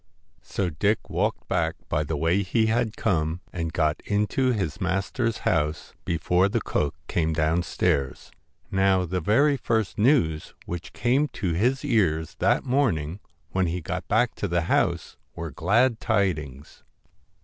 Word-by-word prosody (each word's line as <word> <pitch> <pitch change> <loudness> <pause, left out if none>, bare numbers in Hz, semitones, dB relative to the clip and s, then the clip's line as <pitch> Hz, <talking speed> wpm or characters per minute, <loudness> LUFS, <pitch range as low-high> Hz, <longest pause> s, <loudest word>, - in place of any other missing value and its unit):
So 95 -3 -2
Dick 100 +8 0
walked - - -1
back 80 -1 0
by 75 - 0
the 75 +1 -3
way 85 +6 +2
he 110 +4 +1
had 110 0 0
come, 85 -4 0
and 80 -2 -3
got 80 -3 0
into 105 +5 +1
his 95 - -2
master's 95 +6 -1
house 75 -2 0
before 90 +3 +2
the 115 +3 0
cook 75 -8 -1
came 80 -1 0
downstairs. 80 -3 0 0.4
Now, 95 -1 +3
the 90 +1 -2
very 140 - +3
first 110 -5 -1
news 105 - +2
which 85 0 -6
came 130 +5 +2
to 90 -4 -2
his 125 - +1
ears 85 - +1
that - - +2
morning 105 - 0 0.3
when 95 -1 +1
he 85 +2 -2
got 90 +1 -5
back 115 +3 +2
to 105 - -2
the 85 -1 +1
house 85 - 0 0.2
were 85 -2 -5
glad 110 - +2
tidings. 80 - -2
90 Hz, 150 wpm, -25 LUFS, 80-110 Hz, 0.4 s, Now